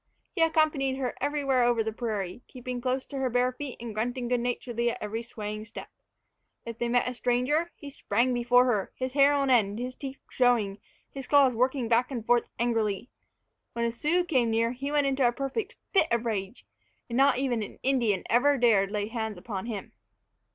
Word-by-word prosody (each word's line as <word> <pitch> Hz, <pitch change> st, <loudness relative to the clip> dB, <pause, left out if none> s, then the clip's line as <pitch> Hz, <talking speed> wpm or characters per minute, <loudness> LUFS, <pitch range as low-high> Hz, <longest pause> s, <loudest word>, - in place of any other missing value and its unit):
He 350 Hz, -, -2 dB
accompanied 310 Hz, -4 st, +2 dB
her 255 Hz, -2 st, -2 dB
everywhere 280 Hz, -3 st, +1 dB
over 240 Hz, -2 st, +2 dB
the 220 Hz, 0 st, -3 dB
prairie, 215 Hz, -3 st, -4 dB
keeping 250 Hz, -1 st, -6 dB
close 255 Hz, +1 st, -1 dB
to 275 Hz, -, -6 dB
her 260 Hz, -1 st, 0 dB
bare 250 Hz, +1 st, +2 dB
feet 265 Hz, 0 st, -7 dB
and 230 Hz, -2 st, -6 dB
grunting 245 Hz, +3 st, -2 dB
good 245 Hz, 0 st, +1 dB
naturedly 240 Hz, 0 st, -1 dB
at -, -, -3 dB
every 215 Hz, +2 st, -4 dB
swaying 215 Hz, -2 st, -6 dB
step. 225 Hz, -, -9 dB, 0.8 s
If 230 Hz, 0 st, -7 dB
they 240 Hz, 0 st, -1 dB
met 245 Hz, +1 st, +2 dB
a 250 Hz, -, -2 dB
stranger, 250 Hz, +7 st, +1 dB
he 285 Hz, -3 st, -10 dB
sprang 250 Hz, -1 st, 0 dB
before 245 Hz, +1 st, +4 dB
her, 215 Hz, -6 st, 0 dB
his 255 Hz, 0 st, -4 dB
hair 280 Hz, 0 st, +5 dB
on 275 Hz, -2 st, +1 dB
end, 210 Hz, -4 st, +3 dB
his 250 Hz, +2 st, -4 dB
teeth 270 Hz, 0 st, -8 dB
showing, 230 Hz, -6 st, +2 dB, 0.3 s
his 270 Hz, -2 st, -8 dB
claws 280 Hz, -3 st, +5 dB
working 255 Hz, +1 st, 0 dB
back 240 Hz, +2 st, +2 dB
and 240 Hz, -5 st, -5 dB
forth 240 Hz, 0 st, +2 dB
angrily. 225 Hz, -1 st, -1 dB, 0.6 s
When 235 Hz, 0 st, -1 dB
a 235 Hz, -, 0 dB
Sioux 310 Hz, +9 st, +1 dB
came 255 Hz, -9 st, +2 dB
near, 230 Hz, +1 st, +1 dB
he 275 Hz, +3 st, -4 dB
went 295 Hz, -1 st, +2 dB
into 270 Hz, -2 st, +2 dB
a -, -, +2 dB
perfect 275 Hz, -, -4 dB, 0.2 s
fit 380 Hz, -5 st, +4 dB
of 235 Hz, 0 st, 0 dB
rage; 210 Hz, 0 st, -3 dB, 0.4 s
and 235 Hz, -, -5 dB
not 275 Hz, 0 st, +4 dB
an 245 Hz, -5 st, -2 dB
Indian 240 Hz, -8 st, +1 dB
ever 280 Hz, +4 st, +3 dB
dared 215 Hz, -6 st, +3 dB
lay 205 Hz, 0 st, -2 dB
hands 220 Hz, -3 st, -4 dB
upon 195 Hz, +2 st, -5 dB
him. 215 Hz, -4 st, -5 dB
245 Hz, 195 wpm, -28 LUFS, 230-270 Hz, 0.8 s, hair